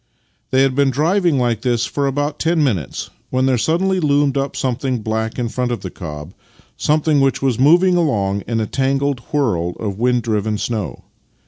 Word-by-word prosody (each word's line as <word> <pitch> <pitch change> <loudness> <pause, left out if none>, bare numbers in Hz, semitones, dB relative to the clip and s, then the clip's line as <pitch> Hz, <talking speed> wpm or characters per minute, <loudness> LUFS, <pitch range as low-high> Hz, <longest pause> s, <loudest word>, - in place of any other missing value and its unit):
They 130 +1 +3
had 135 -1 +2
been 140 +1 +3
driving 165 +3 +2
like 120 -4 0
this 120 -2 +1
for 140 +3 -1
about 145 +2 -2
ten 165 -1 +2
minutes 95 - -2 0.2
when 130 0 +1
there 130 -2 +2
suddenly 185 - +1
loomed 145 -3 +2
up 140 0 -2
something 130 -2 -2
black 110 0 -2
in 120 -2 -1
front 125 +1 -2
of 120 - -3
the 95 - -6
cob 75 -1 -8 0.2
— - - -30
something 150 -1 +2
which 135 0 +1
was 130 -4 +1
moving 175 +7 +5
along 100 - +1
in 115 -1 -1
a 110 - 0
tangled 135 +2 0
whirl 90 - 0
of 100 -2 -4
wind 125 0 +2
driven 110 -1 -1
snow. 110 -3 -4
130 Hz, 190 wpm, -19 LUFS, 110-145 Hz, 0.2 s, moving